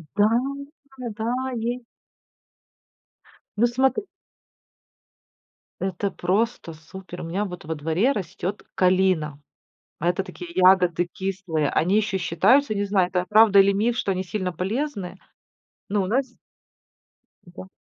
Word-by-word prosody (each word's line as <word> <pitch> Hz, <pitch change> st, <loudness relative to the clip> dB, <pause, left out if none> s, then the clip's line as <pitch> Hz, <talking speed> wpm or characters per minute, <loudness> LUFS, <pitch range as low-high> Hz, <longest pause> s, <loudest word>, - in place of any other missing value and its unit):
Да, 205 Hz, +1 st, +4 dB, 0.9 s
да, 225 Hz, +2 st, -1 dB, 0.3 s
есть. 240 Hz, +2 st, -2 dB, 1.8 s
Ну, 240 Hz, +3 st, +4 dB
смотри 265 Hz, -, +1 dB, 1.8 s
Это 190 Hz, +1 st, -2 dB
просто 195 Hz, -1 st, -1 dB
супер. 180 Hz, +3 st, -10 dB
У -, -, -6 dB
меня 190 Hz, +5 st, -2 dB
вот 180 Hz, -4 st, -8 dB
во 160 Hz, +1 st, -3 dB
дворе 160 Hz, -, +1 dB
растёт 195 Hz, -3 st, -4 dB
калина. 180 Hz, -6 st, +2 dB, 0.6 s
Это 175 Hz, +4 st, +1 dB
такие 180 Hz, -2 st, -9 dB
ягоды 180 Hz, -2 st, +4 dB
кислые. 185 Hz, -6 st, -2 dB
Они 185 Hz, +8 st, +2 dB
ещё 205 Hz, -2 st, +1 dB
считаются, 215 Hz, -, +3 dB
не 205 Hz, -, 0 dB
знаю, 195 Hz, -3 st, +2 dB
это 180 Hz, 0 st, -1 dB
правда 215 Hz, -1 st, +6 dB
или 195 Hz, +1 st, +5 dB
миф, 225 Hz, +4 st, +1 dB
что 200 Hz, -5 st, 0 dB
они 185 Hz, 0 st, -3 dB
сильно 185 Hz, 0 st, -3 dB
полезны. 195 Hz, -, -3 dB, 0.7 s
Ну, 200 Hz, 0 st, +1 dB
у -, -, -2 dB
нас 260 Hz, +7 st, +1 dB, 1.2 s
Да. 175 Hz, +1 st, -11 dB
190 Hz, 120 wpm, -24 LUFS, 180-215 Hz, 1.8 s, правда